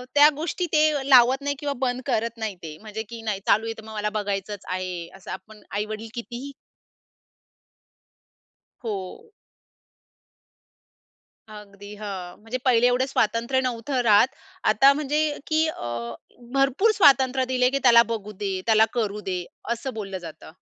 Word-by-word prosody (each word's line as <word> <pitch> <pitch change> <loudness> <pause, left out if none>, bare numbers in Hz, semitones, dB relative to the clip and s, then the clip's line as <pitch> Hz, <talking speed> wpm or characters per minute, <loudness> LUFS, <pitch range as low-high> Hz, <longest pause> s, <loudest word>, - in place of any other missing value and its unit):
त्या 295 +1 +8
गोष्टी 335 +4 -2
ते 305 -3 +2
लावत 260 +1 +6
नाही 285 0 -1
किंवा 290 -1 -2
बंद 255 -1 -1
करत 230 -3 -1
नाही 220 -3 -3
ते 155 -2 -8
म्हणजे 215 0 -6
की 230 -1 -8
"नाही, 215 -3 -2
चालू 215 +2 +4
आहे, 225 - -3
तर 220 - -10
मग 220 - -9
मला 210 0 -1
बघायचंच 205 -1 -3
आहे," 180 -2 -4
असं. 190 - -10
आपण 210 +3 -9 0.2
आई-वडील 215 +2 -4
कितीही 240 +3 -7 2.3
हो. 215 - -6 2.2
अगदी, 205 -1 -11
हां. 195 -4 -6
म्हणजे 225 +4 -4
पहिले 245 -2 +5
एवढे 250 +2 +2
स्वातंत्र्य 235 0 +1
नव्हतं 255 +1 -2
राहत. 215 -1 +5 0.4
आता 225 +6 +6
म्हणजे, 300 +1 0
की 315 0 +2
अ, 315 - -5 0.7
भरपूर 275 - +3
स्वातंत्र्य 265 -5 +4
दिले 250 -1 +2
की 275 +1 -1
त्याला 235 -2 +8
बघू 210 -2 -6
दे, 195 -2 -3
त्याला 220 -1 +5
करू 210 -4 -2
दे, 185 -3 -3 0.3
असं 250 +3 -3
बोललं 195 -3 -5
जातं. 165 -3 -10
230 Hz, 145 wpm, -24 LUFS, 205-265 Hz, 2.3 s, त्या